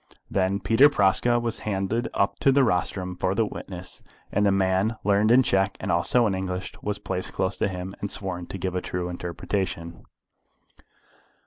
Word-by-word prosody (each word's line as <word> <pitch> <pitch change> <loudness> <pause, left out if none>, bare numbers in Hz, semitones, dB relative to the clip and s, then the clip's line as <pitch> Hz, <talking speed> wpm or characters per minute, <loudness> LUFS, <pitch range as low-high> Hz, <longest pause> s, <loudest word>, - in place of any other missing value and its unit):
Then 95 +1 +1
Peter 125 +7 +5
Praska 120 +1 +3
was 120 -1 -2
handed 105 +3 -1
up 100 - +1
to 135 - +4
the 135 0 +4
rostrum 90 -3 0
for 95 +2 -1
the 115 +1 +2
witnesses, 90 -3 -6 0.3
and 105 - +1
the 100 - +4
man 95 +3 +1
learned 105 +2 +3
in 125 +3 +6
Czech 95 -3 +1
and - - -2
also 85 +8 +3
in 105 - +1
English 95 0 -3
was 105 0 -2
placed 90 -2 -4
close 95 +1 -1
to - - +2
him, 95 0 -5
and 100 - -2
sworn 90 -4 -4
to - - -6
give 95 0 -3
a 90 - -1
true 90 0 -3
interpretation. 85 -1 -4
95 Hz, 180 wpm, -25 LUFS, 90-105 Hz, 0.3 s, in